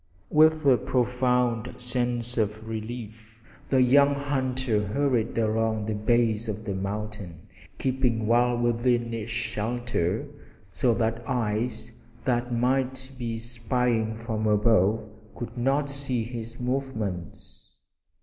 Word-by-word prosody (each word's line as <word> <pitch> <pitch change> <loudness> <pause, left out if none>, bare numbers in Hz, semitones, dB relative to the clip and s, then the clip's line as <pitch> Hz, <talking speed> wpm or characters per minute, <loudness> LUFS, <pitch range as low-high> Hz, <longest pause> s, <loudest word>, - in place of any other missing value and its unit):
With 155 0 +5
a 130 -3 +6
profound 125 -1 0
sense 120 -1 -1
of 110 0 -1
relief 110 0 -7 0.3
the 130 -2 +5
young 140 +3 +5
hunter 130 -5 0
hurried 120 +1 0
along 110 -1 +1
the 110 +1 -2
base 115 +1 +1
of 110 0 -4
the 100 - -2
mountain, 100 -3 -5 0.4
keeping 125 -4 0
well 120 +2 +3
within 120 0 +1
its 115 -1 -4
shelter 115 - -1 0.4
so 120 +4 +2
that 115 0 0
eyes 110 -2 -1 0.3
that 120 -1 0
might 130 +2 0
be 115 -2 -2
spying 115 -1 0
from 110 -1 -2
above 105 0 +3 0.3
could 120 0 -6
not 135 +4 +1
see 140 -4 -2
his 115 0 -7
movements. 120 - -4
120 Hz, 115 wpm, -27 LUFS, 110-125 Hz, 0.4 s, a